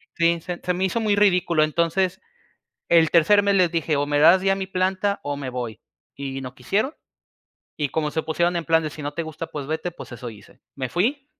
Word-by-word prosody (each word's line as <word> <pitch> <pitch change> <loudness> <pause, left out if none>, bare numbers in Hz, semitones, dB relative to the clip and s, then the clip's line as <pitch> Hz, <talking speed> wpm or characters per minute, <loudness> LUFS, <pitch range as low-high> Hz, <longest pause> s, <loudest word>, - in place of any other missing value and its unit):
sí, 170 0 +2
se 175 +1 -5
se 180 - 0
me 180 +1 -2
hizo 190 +5 -1
muy 210 -2 +2
ridículo, 180 -5 +3
entonces, 170 +4 0 0.7
el 165 -2 +5
tercer 175 +5 +5
mes 200 0 +2
les 180 -3 +3
dije: 165 -3 0
"O 145 - +1
me 145 0 +1
das 170 +5 +7
ya 195 0 +2
mi 190 -1 -4
planta 190 +2 0
o 145 0 -3
me 140 -2 -5
voy", 120 -4 -5 0.3
y 135 -1 -5
no 130 0 -8
quisieron, 220 +10 -1 0.8
y 150 -3 -1
como 150 +1 -2
se 160 - -1
pusieron 170 +3 0
en 170 -1 -2
plan 165 0 +3
de: 155 - -3
"Si 150 - -9
no 145 0 -4
te 165 +2 -4
gusta, 160 +1 -7
pues 150 -4 -6
vete", 160 +4 -3
pues 160 - -11
eso 120 0 -7
hice. 105 -3 -16 0.2
Me 130 -2 -3
fui 260 - -1
165 Hz, 225 wpm, -23 LUFS, 145-185 Hz, 0.8 s, das